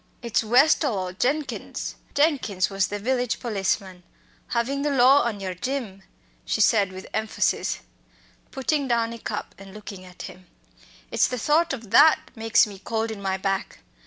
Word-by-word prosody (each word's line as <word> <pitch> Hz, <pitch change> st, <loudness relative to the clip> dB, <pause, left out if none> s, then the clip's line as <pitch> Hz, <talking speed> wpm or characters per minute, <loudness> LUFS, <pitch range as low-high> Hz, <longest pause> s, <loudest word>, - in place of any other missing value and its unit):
"It's 235 Hz, -1 st, 0 dB
Westall 255 Hz, +1 st, +4 dB
or 185 Hz, -1 st, -3 dB
Jenkins 275 Hz, +9 st, -2 dB, 0.2 s
(Jenkins 275 Hz, -, +1 dB
was 195 Hz, -1 st, +1 dB
the 205 Hz, -, -4 dB
village 245 Hz, +2 st, -1 dB
policeman) 195 Hz, -4 st, -2 dB, 0.5 s
havin' 270 Hz, +4 st, -1 dB
the 295 Hz, -, 0 dB
law 270 Hz, +1 st, +6 dB
on 235 Hz, -4 st, -2 dB
yer, 190 Hz, -2 st, -4 dB
Jim," 215 Hz, -1 st, -4 dB, 0.4 s
she -, -, -2 dB
said 205 Hz, -5 st, +3 dB
with 190 Hz, 0 st, -9 dB
emphasis, 220 Hz, 0 st, -1 dB, 0.7 s
putting 275 Hz, +1 st, -1 dB
down 230 Hz, -1 st, 0 dB
a 230 Hz, -, -9 dB
cup 210 Hz, -1 st, -5 dB
and 195 Hz, 0 st, -12 dB
looking 200 Hz, -3 st, -9 dB
at 180 Hz, 0 st, -11 dB
him 185 Hz, -1 st, -11 dB, 0.6 s
it's -, -, +3 dB
the 250 Hz, -, -4 dB
thought 310 Hz, +7 st, +2 dB
of 230 Hz, -6 st, -6 dB
that 315 Hz, +7 st, +7 dB, 0.2 s
makes 225 Hz, -1 st, +3 dB
me 200 Hz, -2 st, -10 dB
cold 225 Hz, +2 st, -2 dB
in 210 Hz, -2 st, -7 dB
my 190 Hz, -1 st, -1 dB
back. 195 Hz, 0 st, -3 dB
225 Hz, 160 wpm, -24 LUFS, 195-260 Hz, 0.7 s, that